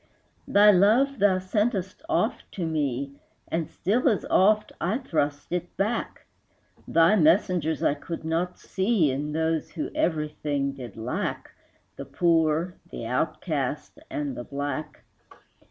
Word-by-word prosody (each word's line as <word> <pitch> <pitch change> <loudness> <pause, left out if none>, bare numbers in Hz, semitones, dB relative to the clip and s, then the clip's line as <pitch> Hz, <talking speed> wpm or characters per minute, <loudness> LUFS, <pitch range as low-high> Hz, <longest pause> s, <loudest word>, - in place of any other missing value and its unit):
Thy 210 +1 +7
love 225 +8 +4
thou 195 -2 +4
sentest 190 0 -1
oft 340 - -1
to 180 - -3
me, 140 -4 -1 0.4
And 165 -2 -2
still 240 +8 +1
as 215 - 0
oft 210 +2 +4
I 190 +7 +1
thrust 145 - -2
it 175 0 -4
back; 210 +5 -2 0.6
Thy 165 +5 +5
messengers 165 -3 +2
I - - +3
could 160 +2 -7
not 170 +3 -1
see 190 - +1
In 145 +3 -3
those 160 0 -1
who 155 - -4
everything 150 -3 -1
did 125 -6 -9
lack, 115 +2 -3 0.5
The 140 - -6
poor, 165 +3 +1 0.2
the 115 - -6
outcast, 150 - -2
and 295 -4 -3
the - - -5
black. 145 +1 -5
165 Hz, 130 wpm, -26 LUFS, 150-200 Hz, 0.6 s, Thy